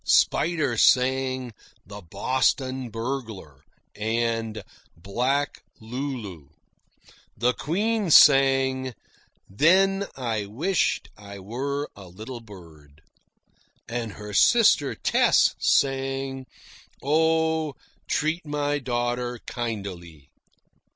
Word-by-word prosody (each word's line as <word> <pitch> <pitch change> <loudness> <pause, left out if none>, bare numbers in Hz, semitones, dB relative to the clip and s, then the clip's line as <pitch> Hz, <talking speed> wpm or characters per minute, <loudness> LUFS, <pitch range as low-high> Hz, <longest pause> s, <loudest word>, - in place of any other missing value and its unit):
Spider 155 -8 +2
sang 130 -1 +2 0.3
"The 100 +3 -10
Boston 130 - -1
Burglar" 115 - -6 0.3
and 115 0 -2 0.3
"Black 125 - -1 0.2
Lulu." 110 - -6 0.9
The 125 +3 +2
Queen 205 - -1
sang 135 -3 +5 0.5
"Then 195 - +3
I 110 -5 -2
Wisht 165 - -1
I 100 -1 -11
Were 135 +9 -4
a 100 -2 -12
Little 110 +8 -9
Bird." 80 -8 -16 0.8
And 115 -2 -4
her 105 -1 -9
sister 210 - +4
Tess - - +3
sang 135 -1 0 0.6
"Oh, 160 0 +1 0.3
Treat 155 +3 -1
My 145 -1 -1
Daughter 120 -1 -2
Kindily." 95 - -6
125 Hz, 85 wpm, -25 LUFS, 105-140 Hz, 0.9 s, sang